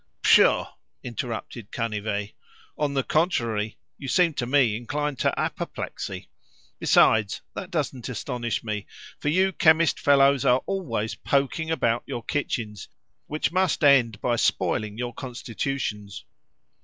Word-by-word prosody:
"Pshaw!" - - +5 0.3
interrupted 120 -2 -5
Canivet; 105 -3 -3 0.4
"on 145 -2 -1
the 135 - +1
contrary, 115 - 0 0.2
you 140 - -7
seem 170 +4 +3
to 120 -4 -3
me 130 -5 +3
inclined 145 +4 -3
to - - +1
apoplexy. - - -4 0.5
Besides, 105 -2 +4
that 185 - -6
doesn't 140 -8 -3
astonish 120 -1 -3
me, 105 -2 -4 0.3
for 150 - -1
you 190 +5 +3
chemist 160 -3 +4
fellows 140 -2 +4
are 125 +1 +3
always 120 - -2
poking 140 +4 -1
about 120 -7 +1
your 120 - -5
kitchens, 110 -8 -3 0.4
which 155 +1 -1
must 185 -2 +1
end 125 -7 +5
by 120 -1 +1
spoiling 105 -2 0
your 120 0 -3
constitutions. 120 -4 -4
125 Hz, 125 wpm, -25 LUFS, 110-145 Hz, 0.5 s, Pshaw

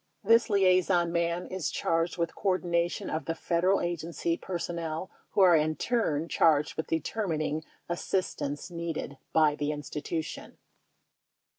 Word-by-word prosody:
This 230 +3 +5
liaison 185 -3 +3
man 170 +1 0
is 185 -3 -3
charged 165 +2 0
with 170 -1 -1
coordination 175 -3 0
of 155 - -3
the 165 - -2
federal 180 +4 +1
agency 170 0 -2
per 180 +1 -4
sonnel 170 0 -4 0.2
who 200 - +3
are 180 -3 +7
in 155 0 +2
turn 165 -11 0
charged 155 -2 +3
with 160 - -3
determining 160 -2 -1 0.2
assistance 175 -3 -2
needed 165 -5 -4
by 155 -2 +4
the 145 0 -2
institution. 150 +2 -5
170 Hz, 130 wpm, -29 LUFS, 155-180 Hz, 0.2 s, are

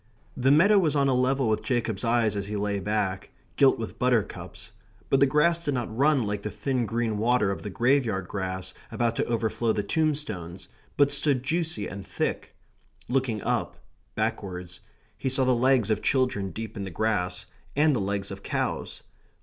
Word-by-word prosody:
The 130 +1 +2
meadow 190 +9 +6
was 155 -6 +1
on 140 -1 +3
a - - +3
level 130 0 +2
with 110 -1 +1
Jacob's 115 -5 -1
eyes 115 -3 +2
as 100 -1 -3
he 105 - -4
lay 100 0 -1
back; 100 -1 -2 0.3
gilt - - +5
with - - -6
buttercups, - - -1 0.4
but 135 - +5
the 140 - +5
grass 165 +5 +2
did 145 -4 -1
not 120 -3 -3
run 140 0 +3
like 105 -1 -2
the 105 - -4
thin 120 +4 -1
green 115 -2 -1
water 115 -3 +2
of 100 - -4
the 105 - -5
graveyard 115 -5 +1
grass 95 -1 -4 0.2
about 115 -1 0
to - - +1
overflow 115 0 0
the 105 - -1
tombstones, 110 - -2 0.3
but 145 0 +4
stood 140 -2 +1
juicy 160 -6 -1
and 100 0 -8
thick. - - -3 0.5
Looking 125 -5 0
up, 115 -6 -1 0.4
backwards, 95 -5 -3 0.4
he 130 - -1
saw 130 0 +1
the 130 - +4
legs 125 -2 +3
of 110 - +1
children 125 -7 +1
deep 110 +2 -7
in 100 - -4
the 95 - -5
grass, 90 -2 -1 0.3
and 150 0 +4
the 115 - 0
legs 100 0 -2
of 95 0 -7
cows. - - -3
115 Hz, 180 wpm, -27 LUFS, 100-135 Hz, 0.5 s, meadow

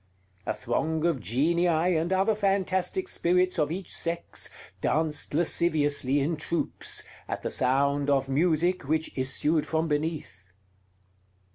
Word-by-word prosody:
A - - +1
throng 160 +7 -1
of 165 -6 +1
genii 155 - +1 0.3
and 165 +3 0
other 190 +3 +3
fantastic 195 - 0
spirits 180 - +1
of 150 0 +1
each 185 +2 -4
sex 170 0 -2 0.3
danced 150 -2 0
lasciviously 145 -4 +2
in 155 +3 -1
troops, 165 +2 -2 0.2
at - - -4
the - - -2
sound 140 +2 +1
of 135 -1 +2
music 165 +3 +1
which 160 0 -1
issued 145 +4 0
from 160 0 0
beneath. 150 - -3
160 Hz, 125 wpm, -27 LUFS, 145-175 Hz, 0.3 s, other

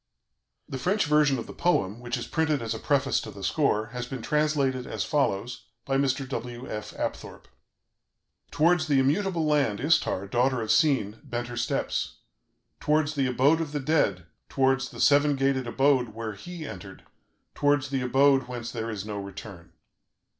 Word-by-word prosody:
The 130 - -5
French 190 +7 +1
version 150 -2 +3
of 115 - -5
the - - -10
poem, 115 - 0
which 120 0 -3
is - - -5
printed 160 -3 0
as 115 0 -2
a 110 - -6
preface 135 -2 +1
to - - -8
the 100 -2 -10
score, 110 - +1
has 125 0 -4
been 130 -3 -6
translated 145 -4 0
as - - -3
follows 125 -5 -1 0.2
by 135 -1 0
Mr. 135 -1 0
W. 120 -1 -6
F. 105 0 -6
Apthorp: - - -5 1.1
"Towards 170 +2 +2
the 145 -2 +3
immutable 165 +5 +1
land 145 -9 +1
Istar, 140 - +1
daughter 125 +5 +1
of 110 -1 -1
Sin, 130 -9 +2
bent 120 0 -4
her 120 - -6
steps, 120 -1 -2 0.6
towards 150 0 +1
the 140 -3 0
abode 135 +6 +3
of 155 -2 -5
the 145 - -1
dead, 130 - +1 0.2
towards 135 0 +1
the - - -11
seven 145 0 +4
gated 135 -2 0
abode 130 -3 +2
where 110 -1 -4
HE 165 - -8
entered, 95 -5 -9 0.5
towards 145 -1 +1
the 135 -1 -1
abode 135 +1 +3
whence 120 -2 -6
there 115 -1 -4
is 105 -3 -5
no 105 -1 -4
return. 100 -3 -9
130 Hz, 170 wpm, -27 LUFS, 115-145 Hz, 1.1 s, seven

